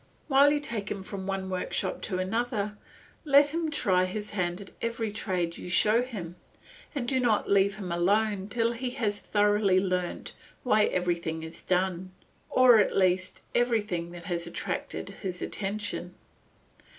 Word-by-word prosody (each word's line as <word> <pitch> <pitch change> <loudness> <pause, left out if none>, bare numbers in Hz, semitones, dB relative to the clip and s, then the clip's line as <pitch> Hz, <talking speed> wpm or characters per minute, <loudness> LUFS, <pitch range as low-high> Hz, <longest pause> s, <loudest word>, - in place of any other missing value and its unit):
While 280 0 +6
you 295 - +2
take 230 -8 -4
him 195 -2 -4
from 190 0 -6
one 195 -1 -2
workshop 185 - -2
to 185 - -1
another, 210 +2 -1 0.5
let 285 -1 +6
him 325 +1 -1
try 185 -11 +2
his 205 +3 -4
hand 180 -2 -1
at 200 - -10
every 230 -2 -2
trade 180 -5 -2
you - - -7
show 215 +6 +4
him, 190 -9 -6 0.6
and 250 -4 -2
do 260 +1 +2
not 235 -4 +2
let 200 0 +3
him 200 -3 -6
leave 200 +5 +2
it 195 - -8
till 230 +1 +1
he 250 +2 -3
has 205 -5 0
thoroughly 205 -2 +3
learnt 180 -2 -2 0.3
why 215 -4 +4
everything 170 -3 -1
is 160 0 -8
done, 185 0 -1 0.4
or 255 -3 +7
at 205 - +2
least 185 -1 +1
everything 210 -8 0
that 175 -1 -10
has 170 -1 -2
attracted 170 - -4
his 185 -3 -4
attention. 200 -3 -4
200 Hz, 160 wpm, -28 LUFS, 185-230 Hz, 0.6 s, or